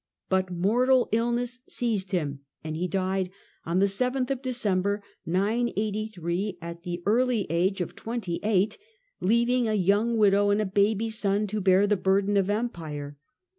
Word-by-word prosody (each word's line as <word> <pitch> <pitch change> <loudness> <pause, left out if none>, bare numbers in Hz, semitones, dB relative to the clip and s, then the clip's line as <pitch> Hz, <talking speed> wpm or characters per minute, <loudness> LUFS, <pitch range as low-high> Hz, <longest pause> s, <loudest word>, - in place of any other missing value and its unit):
But 190 -1 +1
mortal 240 +8 +2
illness 240 +2 0
seized 215 -5 -2
him, 150 -7 -1 0.2
and 155 0 -4
he 175 +3 -1
died 185 +1 -1 0.4
on 170 +2 +1
7th 250 +6 +1
December 205 -6 0 0.2
983, 205 -2 -1
at 170 0 -8
the 175 -1 -5
early 235 0 +2
age 185 +3 +1
of 175 - -4
twenty 225 -7 -4
eight, 205 0 +1 0.4
leaving 235 +4 +2
a 215 - +1
young 205 +4 +2
widow 205 -1 +4
and 205 +1 +3
a 215 - +1
baby 205 +3 +1
son 210 -1 0
to 210 +1 -3
bear 190 +1 +4
the 205 0 +2
burden 195 +2 +2
of 195 -1 +2
empire. 160 -10 -3
200 Hz, 145 wpm, -27 LUFS, 185-225 Hz, 0.4 s, widow